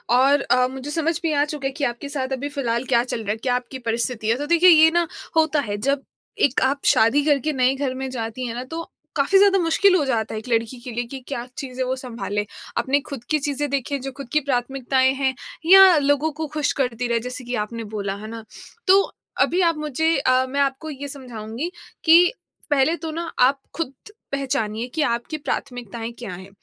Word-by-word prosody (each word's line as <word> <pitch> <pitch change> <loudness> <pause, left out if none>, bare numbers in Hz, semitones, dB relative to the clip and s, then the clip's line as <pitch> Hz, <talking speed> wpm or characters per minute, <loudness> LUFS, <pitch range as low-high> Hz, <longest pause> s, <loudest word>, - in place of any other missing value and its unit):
और 275 +3 +4
अ, 250 -1 +3
मुझे 265 +2 -7
समझ 325 +1 0
भी 325 - +1
आ 290 0 +3
चुका 295 -2 -6
है - - -3
कि - - -2
आपके 240 +2 -2
साथ 270 -2 -3
अभी 275 +2 -3
फ़िलहाल 245 -4 -2
क्या 240 -2 +3
चल 240 -2 -4
रहा 205 - -2
है, 220 - -2
क्या 245 +2 0
आपकी 250 +1 -5
परिस्थिति 230 -1 -1
है। 225 - +4
तो 290 - -3
देखिए 340 +3 +6
ये 320 -1 +7
ना 345 0 +1 0.3
होता 315 -1 +3
है 205 -6 -4
जब 275 0 +1 0.4
एक 265 - -2
आप 275 +2 +1
शादी 230 +6 +4
करके 300 0 +2
नए 255 -1 +3
घर 270 -2 -2
में 265 0 -4
जाती 235 0 -4
हैं 230 - -5
ना 245 - -4
तो 325 +6 -6 0.3
काफ़ी 305 +7 +3
ज़्यादा 390 0 +5
मुश्किल 365 +3 +4
हो 335 - +3
जाता 225 -5 -1
है - - -2
एक 220 - -12
लड़की 230 +1 0
के 240 +1 -8
लिए 240 +1 -2
कि 270 - -5
क्या 240 -4 -4
चीज़ें 260 -1 -4
वो 255 +1 -1
संभाले। 230 -5 -4 0.3
अपने 265 +4 +2
खुद 275 -5 -6
की 310 - +2
चीज़ें 290 0 -2
देखें, 280 +1 -2
जो 270 +1 -5
खुद 275 -3 -7
की 300 - +5
प्राथमिकताएँ 260 -1 +1
हैं 270 -1 0 0.3
या 380 0 +8
लोगों 285 +2 +2
को 315 +1 -5
ख़ुश 300 0 -1
करती 245 -1 -1
रहे 235 -1 +1
जैसे 250 +2 -6
कि 245 +1 -3
आपने 230 +1 -7
बोला। 200 -1 -2
है 210 +2 -8
ना? 225 0 -7 0.4
तो 390 +1 +7 0.4
अभी 360 - +3
आप 335 -2 +2
मुझे 305 +2 0
अ, 255 -1 +3
मैं 280 +2 -2
आपको 275 +3 -1
ये 285 -1 -6
समझाऊँगी 250 +2 -6 0.3
कि 345 +4 +6 0.4
पहले 290 +3 +3
तो 330 -1 -6
ना 335 +1 -4
आप 270 +2 +4 0.2
खुद 315 -5 -3 0.4
पहचानिए 240 -4 -2
कि 315 - +1
आपकी 240 +3 -1
प्राथमिकताएँ 235 -5 -4
क्या 225 -7 -6
हैं? 185 +2 -10
270 Hz, 220 wpm, -22 LUFS, 240-300 Hz, 0.4 s, या